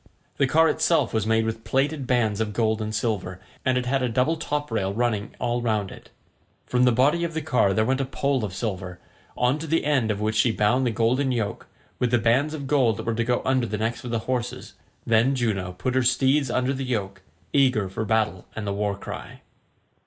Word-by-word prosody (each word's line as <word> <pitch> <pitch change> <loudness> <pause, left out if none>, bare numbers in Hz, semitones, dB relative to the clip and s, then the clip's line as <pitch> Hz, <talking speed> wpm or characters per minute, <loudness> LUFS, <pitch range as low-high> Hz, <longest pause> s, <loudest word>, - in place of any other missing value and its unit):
The 140 - +3
car 160 +4 +4
itself 155 -5 +2
was 110 -2 0
made 110 0 +2
with 110 0 -4
plaited 135 +2 0
bands 110 -4 +1
of 105 -1 -2
gold 110 0 +1
and 110 - -2
silver, 105 -4 -2 0.2
and 130 -1 +2
it 125 - -1
had 135 +2 0
a 125 - 0
double 130 +8 +1
top 150 -3 -3
rail 100 -4 0
running 110 -1 -1
all 120 0 -1
round 110 -5 -1
it. - - -13 0.6
From 125 0 +2
the 125 - +5
body 140 +8 +3
of 165 -1 -3
the 160 - -1
car 125 -9 +2
there 110 +3 +2
went 130 +3 +1
a - - -1
pole 135 -1 -1
of 105 - -3
silver, 95 -5 -4 0.4
on 125 +4 +2
to 160 - -6
the 165 0 +1
end 135 -7 +2
of 105 -1 -1
which 110 +1 -1
she 115 +2 +3
bound 120 +5 +2
the - - +2
golden 120 +5 +1
yoke, 110 -5 -3 0.3
with 125 - +1
the 120 - +3
bands 125 +7 +2
of 140 -3 -6
gold 130 -7 +2
that - - -6
were 115 - 0
to 115 +1 0
go 120 +1 0
under 130 -2 +1
the 105 0 -3
necks 115 +3 -2
of 125 - -6
the 115 - 0
horses. 125 -2 -3 0.3
Then 115 +4 +3
Juno 100 -7 -1
put 125 +8 -3
her 130 - +3
steeds 130 +3 +2
under 130 +2 0
the 135 0 -4
yoke, 100 -7 -3 0.3
eager 130 -8 +3
for 95 +4 -4
battle 110 -4 0
and 110 - -4
the 100 - -1
war 100 -1 -1
cry. - - -8
120 Hz, 225 wpm, -24 LUFS, 110-130 Hz, 0.6 s, the